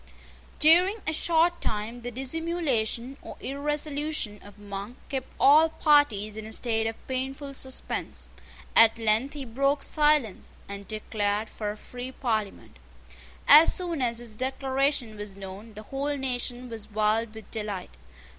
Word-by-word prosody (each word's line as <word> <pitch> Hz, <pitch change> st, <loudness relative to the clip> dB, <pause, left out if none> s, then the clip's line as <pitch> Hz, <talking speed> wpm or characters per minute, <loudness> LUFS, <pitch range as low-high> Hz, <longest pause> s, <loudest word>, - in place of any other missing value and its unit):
During 350 Hz, +6 st, +6 dB
a 315 Hz, -, 0 dB
short 335 Hz, +2 st, +2 dB
time 220 Hz, +3 st, -3 dB
the 245 Hz, -, -4 dB
dissimulation 270 Hz, -3 st, -2 dB
or -, -, -10 dB
irresolution 290 Hz, -4 st, -2 dB
of 205 Hz, 0 st, -14 dB
Monk 205 Hz, +3 st, -7 dB
kept 265 Hz, -2 st, -3 dB
all 310 Hz, +3 st, +7 dB
parties 290 Hz, -10 st, +3 dB
in 220 Hz, 0 st, -7 dB
a -, -, -9 dB
state 225 Hz, -1 st, +1 dB
of 225 Hz, -, -3 dB
painful 270 Hz, +2 st, -4 dB
suspense. 265 Hz, -1 st, -3 dB, 0.5 s
At 225 Hz, 0 st, +8 dB
length 225 Hz, +5 st, +2 dB
he 280 Hz, -2 st, -5 dB
broke 275 Hz, +4 st, 0 dB
silence, 295 Hz, -, +1 dB
and 200 Hz, 0 st, -8 dB
declared 215 Hz, 0 st, -2 dB
for 210 Hz, -2 st, -4 dB
a 210 Hz, -, -5 dB
free 250 Hz, +3 st, -8 dB
Parliament. 215 Hz, -, -3 dB, 0.7 s
As 305 Hz, +3 st, +8 dB
soon 345 Hz, -5 st, -2 dB
as 235 Hz, -2 st, 0 dB
his 235 Hz, -2 st, -4 dB
declaration 265 Hz, -1 st, -1 dB
was 205 Hz, -2 st, -6 dB
known, 200 Hz, +3 st, -9 dB
the 215 Hz, -, -8 dB
whole 280 Hz, +5 st, -3 dB
nation 250 Hz, -1 st, -2 dB
was 225 Hz, -3 st, -8 dB
wild 215 Hz, +1 st, 0 dB
with 220 Hz, -, -11 dB
delight. 210 Hz, -4 st, -4 dB
245 Hz, 145 wpm, -27 LUFS, 215-285 Hz, 0.7 s, At